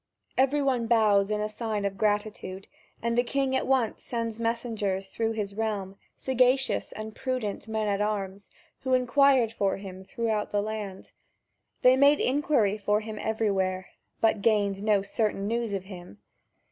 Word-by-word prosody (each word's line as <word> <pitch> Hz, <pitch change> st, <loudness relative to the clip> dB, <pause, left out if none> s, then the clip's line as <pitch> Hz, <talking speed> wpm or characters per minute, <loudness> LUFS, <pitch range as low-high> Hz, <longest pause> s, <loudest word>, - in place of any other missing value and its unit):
Everyone 270 Hz, -3 st, +2 dB
bows 210 Hz, -4 st, +4 dB
in 210 Hz, 0 st, 0 dB
sign 215 Hz, -1 st, -3 dB
of 195 Hz, -1 st, -2 dB
gratitude, 205 Hz, -2 st, -2 dB, 0.4 s
and 235 Hz, 0 st, 0 dB
the 240 Hz, -, +4 dB
king 270 Hz, +1 st, 0 dB
at -, -, 0 dB
once 260 Hz, -5 st, +1 dB
sends 230 Hz, -2 st, -3 dB
messengers 220 Hz, -5 st, -2 dB
through 225 Hz, +2 st, -1 dB
his 205 Hz, -2 st, -3 dB
realm, 205 Hz, -3 st, -3 dB, 0.2 s
sagacious 260 Hz, +1 st, +1 dB
and 215 Hz, 0 st, -7 dB
prudent 250 Hz, -6 st, -3 dB
men 220 Hz, -1 st, -1 dB
at 200 Hz, 0 st, 0 dB
arms, 200 Hz, -2 st, -3 dB, 0.3 s
who 260 Hz, -1 st, +1 dB
inquired 255 Hz, -1 st, +4 dB
for 200 Hz, -4 st, 0 dB
him 190 Hz, -1 st, -9 dB
throughout 215 Hz, +1 st, -2 dB
the 205 Hz, 0 st, 0 dB
land. 210 Hz, -3 st, -6 dB, 0.7 s
They 255 Hz, +1 st, +7 dB
made 285 Hz, +2 st, +5 dB
inquiry 250 Hz, -7 st, +2 dB
for 210 Hz, +1 st, +1 dB
him 215 Hz, -1 st, -7 dB
everywhere, 190 Hz, -4 st, -1 dB, 0.3 s
but 220 Hz, -2 st, +3 dB
gained 200 Hz, -2 st, +2 dB
no 205 Hz, -2 st, +2 dB
certain 200 Hz, -1 st, -1 dB
news 230 Hz, 0 st, -1 dB
of 195 Hz, -2 st, -2 dB
him. 180 Hz, -, -11 dB
215 Hz, 150 wpm, -27 LUFS, 200-235 Hz, 0.7 s, They